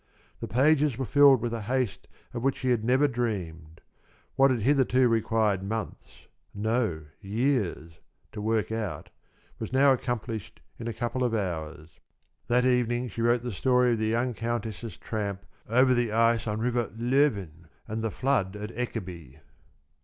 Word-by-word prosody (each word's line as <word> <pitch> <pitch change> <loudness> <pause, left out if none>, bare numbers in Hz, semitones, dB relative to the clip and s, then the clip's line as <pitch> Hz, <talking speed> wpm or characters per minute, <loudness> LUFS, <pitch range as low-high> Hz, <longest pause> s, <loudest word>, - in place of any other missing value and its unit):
The - - -5
pages 145 +1 +3
were 130 - -2
filled 140 -2 +6
with 120 0 -2
a 115 - -3
haste 125 0 -2 0.3
of 120 - -4
which 135 +2 +1
she 130 -1 0
had 115 -3 +1
never 130 +5 +3
dreamed. 85 - -4 0.5
What 135 0 +5
had 125 -4 0
hitherto 130 -1 +3
required 110 -3 +1
months 110 +3 -6 0.3
no, 110 -6 -1 0.2
years 100 - -1 0.3
to 105 - -6
work 110 0 0
out, 110 -4 -4 0.5
was - - -5
now 135 +1 +5
accomplished 115 -4 -4 0.2
in 115 - -5
a - - -1
couple 120 +3 -2
of 120 -2 +1
hours. 80 -5 -5 0.5
That 125 +1 +3
evening 125 -1 +1
she 115 - -5
wrote 120 +1 +2
the 120 - -3
story 125 +6 +2
of 115 - 0
the 110 - 0
young 120 +3 0
countess' 115 -2 -4
tramp 100 -3 -4 0.2
over 130 +3 +4
the 120 -3 +1
ice 115 +1 +2
on 105 +1 -2
River 120 0 0
Löven, 115 - +1 0.2
and 110 0 -3
the 115 - 0
flood 115 -5 0
at 105 +1 -6
Ekeby. 90 - -6
115 Hz, 160 wpm, -27 LUFS, 105-125 Hz, 0.5 s, filled